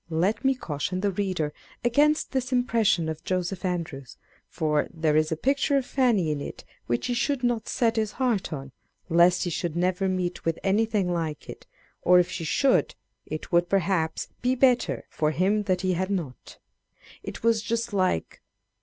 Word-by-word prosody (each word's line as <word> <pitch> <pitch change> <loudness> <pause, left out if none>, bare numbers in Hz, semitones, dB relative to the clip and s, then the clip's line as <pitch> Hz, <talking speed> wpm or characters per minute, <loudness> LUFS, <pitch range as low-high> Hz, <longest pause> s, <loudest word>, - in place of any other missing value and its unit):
Let 175 +6 0
me 270 0 +3
caution 180 - -3
the 200 0 +1
reader 185 -6 -2 0.3
against 295 +6 +2
this 260 -1 -2
impression 225 -8 +2
of 160 0 -5
Joseph 185 +1 -2
Andrews; 160 -8 -4 0.3
for 150 -3 0
there 160 -2 0
is 155 +1 +2
a 160 - -1
picture 275 - +1
of 265 - -1
Fanny 230 - +2
in 145 -1 -3
it - - -7 0.2
which 120 0 -1
he 245 - 0
should 265 +1 0
not 240 -2 0
set 230 -2 +1
his 215 -1 0
heart 240 -9 0
on, 135 -3 -6 0.4
lest 175 +2 +4
he 175 - -2
should 165 0 -3
never 185 +2 +1
meet 180 -1 -2
with 165 -1 0
anything 200 -2 +1
like 160 -3 -3
it; - - -10 0.3
or 180 +1 +5
if 180 -1 +3
he 170 - -4
should, 265 - +2 0.3
it 155 - -6
would, 175 0 +3
perhaps, 180 -4 0
be 250 +1 +2
better 250 -1 +2
for 150 - 0
him 190 +6 +1
that 185 -1 +2
he 185 -1 +1
had 185 +2 -1
not. 165 -10 -5 0.7
It - - -7
was 230 -1 +3
just 230 0 -2
like 185 - 0
185 Hz, 180 wpm, -26 LUFS, 165-230 Hz, 0.7 s, or